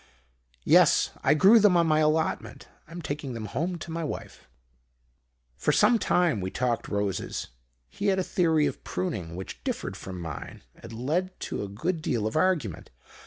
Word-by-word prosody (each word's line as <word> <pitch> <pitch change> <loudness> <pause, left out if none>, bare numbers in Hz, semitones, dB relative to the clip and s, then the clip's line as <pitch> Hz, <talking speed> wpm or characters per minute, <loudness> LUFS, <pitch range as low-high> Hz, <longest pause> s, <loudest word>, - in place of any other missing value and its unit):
"'Yes. - - +5
I - - +4
grew 195 +8 +7
them 200 -4 +5
on 170 - +4
my 155 -1 +3
allotment. 155 +1 0 0.2
I'm 170 +1 -8
taking 145 -3 -4
them 115 -2 -5
home 165 - -2
to 165 0 -8
my 165 0 -3
wife.' 150 - -7 1.1
"For 150 - +1
some 235 +9 +4
time 170 - +2
we 95 - -2
talked 120 +2 -1
roses. 100 -2 -3 0.4
He 205 - -4
had 195 -1 +3
a 190 - +1
theory 160 -5 +2
of 140 - -4
pruning, 90 -2 -4
which 95 +1 -8
differed - - -3
from 95 -2 -7
mine, 85 -1 -7
and - - -12
led 155 +11 -2
to - - -4
a 100 - -4
good 160 - -2
deal 115 -8 -1
of 110 - -2
argument. 155 - 0
150 Hz, 170 wpm, -27 LUFS, 110-175 Hz, 1.1 s, grew